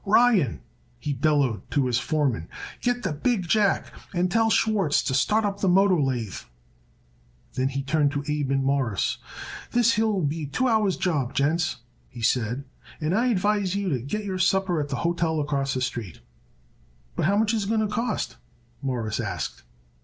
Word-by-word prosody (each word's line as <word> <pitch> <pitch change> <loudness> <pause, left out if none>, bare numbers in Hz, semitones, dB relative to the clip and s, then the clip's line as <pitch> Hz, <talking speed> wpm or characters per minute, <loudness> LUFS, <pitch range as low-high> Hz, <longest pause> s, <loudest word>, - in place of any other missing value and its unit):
"Ryan," 210 - +3 0.4
he 145 +4 -3
bellowed 140 - +1
to 140 -2 +1
his 120 -1 +1
foreman, 135 - -1 0.3
"get 245 0 0
the - - -1
big 190 +4 0
jack, 205 +1 +2 0.2
and 175 +1 +1
tell 225 +2 +3
Schwartz 205 -9 +2
to - - -1
start 210 +11 +2
up 200 -1 -2
the 195 - +2
motor 185 -2 +4
lathe." 125 -7 -2 1.1
Then 130 0 0
he 135 0 -3
turned 145 +1 +2
to 145 -1 -2
Abe 150 -2 -1
and 135 0 +1
Mawruss. 135 -7 0 0.5
"This 235 -1 +4
here'll 215 -4 +1
be 150 +2 -1
a - - -6
two 255 - 0
hours' 215 -5 +2
job, 140 -8 -1
gents," 155 -1 +1 0.3
he 120 -2 -9
said, 120 +2 +1 0.4
"and 155 +2 0
I 230 +5 +2
advise 205 -3 +1
you 200 -1 -1
to 135 -6 0
get 205 - -4
your 190 -2 -3
supper 185 -2 +2
at 145 - -4
the 140 - -2
hotel 170 -2 +1
acrosst 140 -2 -1
the 130 - -1
street." 120 - -4 0.9
"But - - +1
how 200 +2 +3
much 220 +1 +2
is 215 -3 0
it - - -5
going 220 -1 +2
to 215 - +1
cost 215 +2 -2
us?" - - -20 0.4
Morris 120 -6 -2
asked. - - -4
160 Hz, 185 wpm, -25 LUFS, 135-205 Hz, 1.1 s, motor